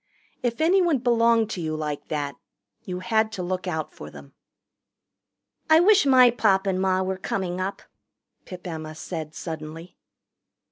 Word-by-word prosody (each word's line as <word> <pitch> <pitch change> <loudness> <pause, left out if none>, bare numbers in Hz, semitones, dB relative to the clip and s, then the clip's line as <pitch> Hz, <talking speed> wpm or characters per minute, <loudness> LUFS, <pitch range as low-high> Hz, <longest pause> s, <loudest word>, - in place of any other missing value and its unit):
If 240 +2 -2
anyone 345 -2 +3
belonged 230 -2 +2
to 180 - -4
you 155 -1 -2
like 150 -2 -4
that, 145 -2 -3 0.5
you 180 -1 -5
had 220 +4 +1
to 185 - -4
look 185 +1 -3
out 160 -3 -3
for - - -10
them. - - -14 1.4
"I 315 0 +7
wish 380 -4 +5
my 255 -2 +7
Pop 200 -5 +2
and 190 -1 0
Ma 190 0 +1
were 190 0 -2
coming 185 -1 -3
up," 195 +2 -4 0.6
Pip 180 0 -10
Emma 155 -2 -6
said 160 -2 -6
suddenly. 160 +1 -7
185 Hz, 150 wpm, -24 LUFS, 165-230 Hz, 1.4 s, I